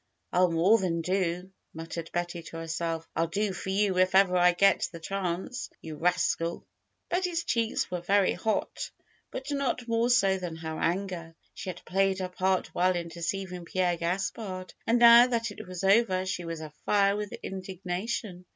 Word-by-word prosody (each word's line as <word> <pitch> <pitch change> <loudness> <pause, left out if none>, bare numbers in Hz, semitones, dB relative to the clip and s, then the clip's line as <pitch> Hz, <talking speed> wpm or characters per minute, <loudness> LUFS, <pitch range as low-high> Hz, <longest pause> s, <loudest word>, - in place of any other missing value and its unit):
ril 180 0 +4
more 185 +7 +4
than 175 -3 -1
do 180 +1 -1 0.2
muttered 165 0 -6
Betty 175 0 -3
to 165 0 -9
her 165 0 -6
self. 165 0 -3
"I'll 165 +1 +1
do 200 +3 -1
for 190 - -6
you 195 -1 +1
if 185 0 +3
ever 190 -2 +5
I 180 0 +6
get 195 +3 +3
the 165 - -8
chance! 190 +7 -3
You 160 -1 -8
rascal 170 0 0 0.2
!" - - -50
Betty's 355 -1 0
cheeks 230 - 0
were 180 -1 -2
very 195 +2 +3
hot; 215 +4 -2 0.4
but 265 +3 -6
not 270 -3 -1
more 230 +1 +1
so 195 -6 +4
than 175 -3 -5
her 160 -1 -5
anger. 175 -2 -2 0.2
She - - -6
had 180 -1 -8
played 195 0 +1
her 185 -1 -3
part 185 +1 0
well 185 +1 +2
in 170 -1 -3
deceiving 180 +1 -4
Pierre 180 0 +1
Gaspard, 185 +2 -3
and 230 - +4
now 235 +1 +9
that 230 -3 -1
it 205 - -10
was 185 0 -6
over 195 -2 +3
she 180 -2 -3
was 165 -1 -5
afire 195 +6 +1
wdth 210 -1 -5
indignation. 185 +1 -4
185 Hz, 180 wpm, -28 LUFS, 170-200 Hz, 0.4 s, now